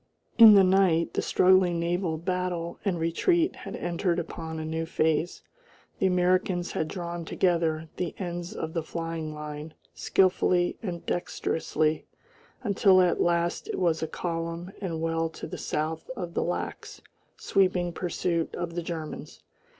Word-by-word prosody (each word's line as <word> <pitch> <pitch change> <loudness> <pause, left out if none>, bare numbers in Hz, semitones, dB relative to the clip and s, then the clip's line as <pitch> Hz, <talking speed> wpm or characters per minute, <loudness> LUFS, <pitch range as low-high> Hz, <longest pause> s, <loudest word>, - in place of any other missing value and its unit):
In 220 -2 +11
the 195 - +7
night 185 -3 +3
the - - 0
struggling 185 -2 +4
naval 170 -1 -1
battle 180 0 -3
and 190 -5 0
retreat 330 - +1
had - - -7
entered 175 0 -1
upon 165 -1 -5
a 160 - -4
new 160 +1 -3
phase. 160 +1 0 0.6
The 190 - +3
Americans 180 0 +1
had 155 - -1
drawn 170 -1 -5
together 165 -2 0
the 175 -2 -3
ends 175 -2 -5
of 160 0 -4
the 165 - -1
flying 165 -1 -4
line 150 +1 -7 0.2
skilfully 180 -1 +2
and 175 -5 -5
dexterously, 160 -3 -1 0.6
until 200 -3 +4
at 180 -1 +3
last 170 0 +1
it - - -3
was 170 -3 +1
a 160 - -1
column 170 +1 -4
and 165 -5 -3
well 165 0 0
to - - -8
the - - -7
south 155 +1 -3
of 175 -2 -5
the - - 0
lax 175 - -4 0.3
sweeping 185 -3 +1
pursuit 170 -1 -2
of 175 -1 -4
the 175 - -2
Germans. 160 -2 -7
170 Hz, 150 wpm, -27 LUFS, 165-180 Hz, 0.6 s, In